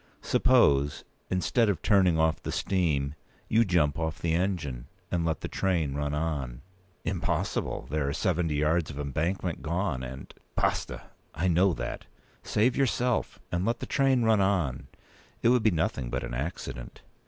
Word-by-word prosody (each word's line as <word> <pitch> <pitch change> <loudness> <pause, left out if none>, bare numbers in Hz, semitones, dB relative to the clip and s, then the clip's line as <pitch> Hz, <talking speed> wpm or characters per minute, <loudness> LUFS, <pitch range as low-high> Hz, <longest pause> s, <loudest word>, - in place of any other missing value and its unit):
Suppose, 70 +1 +3 0.3
instead 105 +5 +2
of 100 - -1
turning 95 -5 +4
off 80 0 +2
the - - -4
steam, 75 -8 0 0.3
you 115 +2 +4
jump 85 -7 +2
off 80 -1 -2
the 85 -1 -1
engine, 80 -9 -1 0.2
and 85 -2 +1
let 80 -3 -1
the - - -3
train 85 -7 0
run 75 0 -2
on?" 75 -6 -3 0.4
"Impossible. - - -1
There 75 0 -1
are - - 0
seventy 85 -1 0
yards 75 +2 +1
of 75 -1 -7
embankment 85 +5 -2
gone, 85 -4 -1
and—" 65 +1 -8 0.2
"Basta! - - -1 0.3
I 85 - 0
know 90 +2 +4
that. - - -5 0.3
Save 120 +4 +2
yourself, 125 -3 +1
and 85 +1 0
let 115 +3 +1
the - - -6
train 135 -3 +2
run 110 -2 +4
on. 90 -10 0 0.6
It 115 - +5
would 125 -1 +4
be 110 - +4
nothing 80 - -1
but 65 +1 -2
an - - -5
accident." 65 -3 -5
85 Hz, 160 wpm, -28 LUFS, 70-95 Hz, 0.6 s, It